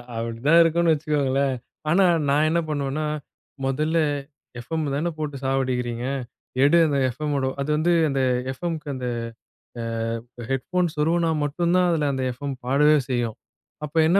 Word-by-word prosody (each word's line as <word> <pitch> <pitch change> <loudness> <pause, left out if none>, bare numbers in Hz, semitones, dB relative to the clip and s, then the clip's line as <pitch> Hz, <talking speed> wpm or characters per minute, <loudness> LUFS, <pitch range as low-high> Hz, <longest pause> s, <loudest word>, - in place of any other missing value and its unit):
அப்டிதான் 115 +8 +2
இருக்குனு 165 +1 +3
வச்சுக்கோங்களேன். 140 -3 0 0.3
ஆனா, 190 +4 +5 0.2
நான் 150 +2 +3
என்ன 170 +2 +2
பண்ணுவேன்னா 145 +1 -1 0.6
"மொதல்ல 155 +5 0 0.6
எஃப்.எம் 160 +6 -3
தானே 165 +4 0
போட்டு 145 -3 -4
சாவடிக்கிறீங்க, 125 -3 -1 0.6
எடு 145 +4 +5
அந்த 145 - 0
எஃப்.எம். 150 +4 -3
மோட 135 -1 0 0.2
"அது 140 - -3
வந்து 170 +3 +2 0.2
அந்த 135 -1 0 0.3
எஃப்.எம்க்கு 160 +1 -4
அந்த 125 -1 -4 0.7
அ - - -3 0.7
ஹெட்ஃபோன் 175 +7 0
சொருவுனா 165 +2 +2
மட்டும் 170 +4 0
தான் 180 -1 +4
அதில 155 -3 +1
அந்த 130 -1 -2
எஃப்எம் 140 +2 -5
பாடவே 150 +4 +4
செய்யும். 120 -3 -1 0.5
அப்ப 150 +2 -12
என்ன 180 +5 +4
145 Hz, 140 wpm, -24 LUFS, 135-165 Hz, 0.7 s, ஆனா